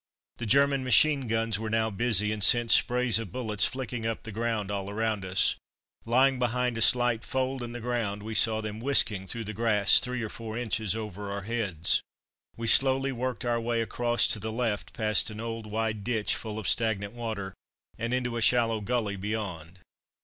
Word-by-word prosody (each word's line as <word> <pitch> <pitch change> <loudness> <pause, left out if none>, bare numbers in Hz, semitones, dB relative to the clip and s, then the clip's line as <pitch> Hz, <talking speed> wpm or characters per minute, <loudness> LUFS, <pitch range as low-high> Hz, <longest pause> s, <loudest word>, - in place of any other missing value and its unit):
The 115 - -5
German 140 +2 +3
machine 135 +2 +4
guns 115 -2 0
were 110 0 -4
now 110 0 0
busy, 105 -1 +3
and 105 -2 -2
sent 120 +1 +6
sprays 125 -3 +4
of 110 -6 -7
bullets 110 -3 0
flicking 125 -3 -5
up 115 - -4
the 115 - -7
ground 110 -2 -2
all 100 0 -4
round 110 -1 -2
us. 95 0 +2 0.5
Lying 130 +3 +3
behind 125 0 0
a 115 - -4
slight 120 -1 +3
fold 130 0 -2
in 120 -1 -6
the 120 - -6
ground 115 -4 -3
we 110 +1 -6
saw 110 0 +2
them 110 0 -6
whisking 110 -7 +2
through 115 +3 -4
the 110 0 -6
grass, 105 -2 +4
three 125 -1 -4
or 110 - -4
four 110 0 -7
inches 110 -3 -2
over 105 -2 -6
our 100 0 -5
heads. 100 -7 0 0.6
We 115 - -5
slowly 135 +3 +4
worked 125 0 -4
our 120 -1 0
way 115 0 -1
across 120 +1 +1
to 105 - 0
the 110 +2 -4
left, 105 -7 -3
past 110 -1 +1
an 110 0 -9
old, 115 -1 -6
wide 110 -1 -3
ditch 110 -1 0
full 110 -2 -7
of 110 -5 -4
stagnant 105 -2 0
water, 110 -5 -5 0.4
and 115 +1 -4
into 120 -2 -2
a - - -3
shallow 115 -2 +2
gully 105 -2 -2
beyond. 95 -4 -5
115 Hz, 195 wpm, -27 LUFS, 105-120 Hz, 0.6 s, sent